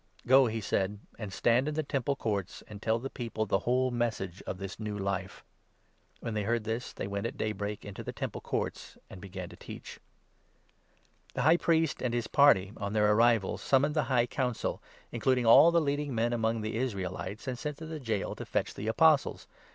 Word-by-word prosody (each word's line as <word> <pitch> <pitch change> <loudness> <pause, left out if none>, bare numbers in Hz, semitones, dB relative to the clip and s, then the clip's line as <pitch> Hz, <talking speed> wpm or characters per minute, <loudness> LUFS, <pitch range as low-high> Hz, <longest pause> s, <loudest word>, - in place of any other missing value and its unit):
"Go," 130 +1 +6
he 110 0 -3
said, 100 0 -1 0.2
"and 105 -3 -5
stand 120 +7 +2
in 150 - -2
the 155 - 0
Temple 140 -1 -1
Courts, 100 -7 -3
and 105 -1 -10
tell 110 0 +2
20 115 - -9
the 135 - -3
people 115 -3 -3
the 95 -1 +1
whole 130 +1 +1
Message 110 -6 -2
of - - -3
this 95 +2 -7
new 105 -2 -4
Life." 95 -1 -3 0.8
When 115 - -4
they 105 - 0
heard 115 +2 0
this, 115 +3 -3
they - - -5
went 100 +3 -2
at - - -8
daybreak 105 -1 -3
into 100 -1 -7
the - - -4
Temple - - -5
21 - - -18
Courts, - - -7
and 90 - -10
began 95 -2 -7
to - - -12
teach. - - -10 1.4
The - - 0
High 160 +3 +6
Priest 165 -3 +1
and 120 -2 -1
his 120 -2 -1
party, 110 -10 +4
on 100 0 -3
their 105 -1 +4
arrival, 115 -2 +3
summoned 140 +2 +2
the 150 -3 +2
High 120 -2 +3
Council, 125 -1 -2 0.3
including 125 +1 +1
all 115 +8 +8
the 170 0 +4
leading 145 -3 -1
men 115 +1 +1
among 115 -1 0
the 110 +1 -3
Israelites, 100 -2 -4
and 125 -2 -3
sent 150 +1 -4
to 160 - -8
the 160 -1 -6
gaol 110 -7 -2
to - - -6
fetch - - -1
the 105 - -6
Apostles. 150 +5 +3
115 Hz, 205 wpm, -30 LUFS, 105-130 Hz, 1.4 s, all